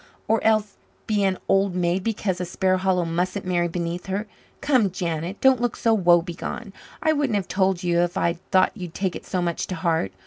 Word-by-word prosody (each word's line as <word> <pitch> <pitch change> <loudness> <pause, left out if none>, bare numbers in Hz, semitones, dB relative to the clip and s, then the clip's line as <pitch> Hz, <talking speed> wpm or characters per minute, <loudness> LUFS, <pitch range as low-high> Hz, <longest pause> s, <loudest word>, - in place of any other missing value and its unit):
Or 225 - +2
else 215 -2 +2 0.3
be 210 -2 +1
an 190 -1 +1
old 195 -1 +2
maid 180 +1 0
because 200 -4 -1
a - - 0
Sparhallow 185 0 +1
mustn't 180 +4 -2
marry 175 -1 +1
beneath 170 +1 -4
her? 195 +3 -2 0.3
Come, 255 -8 +3
Janet, 170 +1 -3
don't 265 -2 +5
look 245 -2 0
so 230 - +2
woebegone. 175 +2 +1 0.3
I 315 - +4
wouldn't 285 -7 0
have 195 -3 -1
told 190 -1 +1
you 170 -1 +2
if 175 0 0
I'd 170 0 0
thought 185 -1 +4
you'd 180 -5 -8
take 190 -2 -1
it - - -9
so 180 -1 -1
much 170 -1 -2
to 185 - -4
heart. 160 - 0
185 Hz, 200 wpm, -24 LUFS, 175-205 Hz, 0.3 s, don't